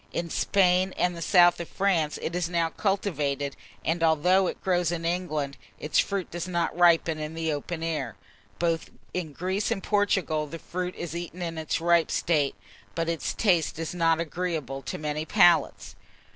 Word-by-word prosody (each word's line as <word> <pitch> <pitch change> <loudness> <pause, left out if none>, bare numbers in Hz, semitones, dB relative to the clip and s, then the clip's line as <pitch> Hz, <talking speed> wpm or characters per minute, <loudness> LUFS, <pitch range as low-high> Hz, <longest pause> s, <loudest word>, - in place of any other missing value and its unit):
In 170 -1 -3
Spain 185 -1 +2
and 180 -1 +1
the 170 - -7
south 175 0 +5
of 170 - -6
France 175 -6 +1
it 170 - -3
is 175 -2 -1
now 170 -2 +1
cultivated; 150 -8 -1 0.3
and 165 +1 0
although 180 +4 +4
it - - -4
grows 175 -3 +1
in 170 -1 -3
England, 155 -6 -2 0.2
its 150 - 0
fruit 200 -3 -1
does 175 +1 -4
not 170 -3 -1
ripen 170 -2 +4
in 155 +1 -5
the 160 -1 -1
open 160 +3 -4
air. 165 -2 -2 0.4
Both 165 -1 -1 0.2
in 175 -4 -3
Greece 185 +7 -2
and 195 - -2
Portugal 195 -7 +1
the 165 - -7
fruit 180 +2 -4
is 170 -1 -6
eaten 175 +1 -5
in 165 -1 -4
its 155 - -1
ripe 170 0 +3
state; 150 -7 +1 0.4
but 165 0 -1
its 165 -1 -2
taste 175 -9 +2
is 165 +1 -4
not 165 -2 +2
agreeable 160 -5 -3
to - - -5
many 150 0 -3
palates. 175 -1 +3
170 Hz, 175 wpm, -27 LUFS, 160-180 Hz, 0.4 s, south